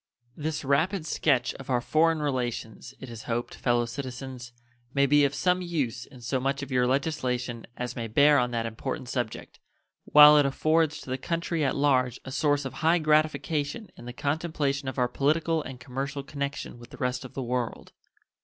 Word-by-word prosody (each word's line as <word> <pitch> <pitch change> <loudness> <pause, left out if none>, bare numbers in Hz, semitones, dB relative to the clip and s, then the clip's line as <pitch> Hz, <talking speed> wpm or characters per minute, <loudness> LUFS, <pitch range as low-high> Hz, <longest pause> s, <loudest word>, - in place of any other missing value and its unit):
This 155 -1 -3
rapid 160 +6 +1
sketch 135 -6 +1
of 135 - -10
our 125 -2 +2
foreign 155 +4 +2
relations, 125 -2 -3
it 130 - -8
is 115 -2 -9
hoped, 120 +1 -2
fellow 120 -1 +1
citizens, 125 0 -7 0.4
may 140 0 +4
be 145 +1 +5
of 140 +1 -1
some 180 +5 +1
use 155 -10 -2
in 130 -3 -15
so 125 +3 -1
much 135 +2 -1
of 140 - -8
your 125 -1 +2
legislation 125 -4 -1
as 125 0 -4
may 115 -2 -3
bear 145 +6 +5
on 125 0 +1
that 115 -1 -2
important 120 +2 -5
subject, 120 -4 -4 0.5
while 150 0 +9
it 145 - +4
affords 155 +2 +1
to 130 - -8
the 130 - -2
country 170 +2 -2
at 135 - +1
large 130 -3 +2
a 130 - -7
source 145 0 +1
of 135 - -5
high 165 +2 +4
gratification 155 +3 0
in - - -12
the 120 - -6
contemplation 140 0 -2
of 130 - -8
our 125 -1 +2
political 160 +5 +1
and 130 -3 -8
commercial 135 +3 -4
connection 140 -3 -5
with 120 +1 -13
the - - -12
rest 125 0 -2
of 130 - -11
the 135 - -3
world. 125 -1 -3
135 Hz, 190 wpm, -27 LUFS, 125-150 Hz, 0.5 s, while